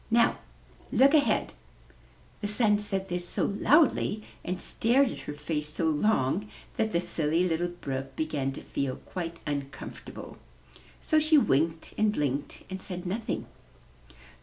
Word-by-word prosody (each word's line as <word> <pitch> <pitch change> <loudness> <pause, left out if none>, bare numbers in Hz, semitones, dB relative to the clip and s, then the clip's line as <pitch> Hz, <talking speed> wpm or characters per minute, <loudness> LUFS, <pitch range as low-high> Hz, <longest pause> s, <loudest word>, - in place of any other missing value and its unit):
Now 235 +1 +3 0.5
look 275 +3 +5
ahead!'' 285 -8 +3 0.9
The 205 - -1
Sun 210 0 +3
said 195 -2 -1
this 175 0 -2
so - - +1
loudly 230 -1 +3 0.2
and 180 +1 -3
stared 245 +6 +3
at - - -7
her 145 - -4
face 150 0 -3
so 165 +2 -1
long 175 +2 +1 0.3
that 220 -1 0
the 170 - +2
Silly 165 +1 +1
Little 170 +1 0
Brook 135 -6 -5
began 150 -4 -1
to - - -8
feel 135 -2 -2
quite 170 -2 -6
uncomfortable; 140 -2 -6 0.6
so 310 - +3
she 310 0 +5
winked 160 - +1
and 215 0 +4
blinked, 145 -6 -2
and 190 0 -6
said 180 -1 -5
nothing. 210 +5 -2
180 Hz, 140 wpm, -28 LUFS, 150-215 Hz, 0.9 s, look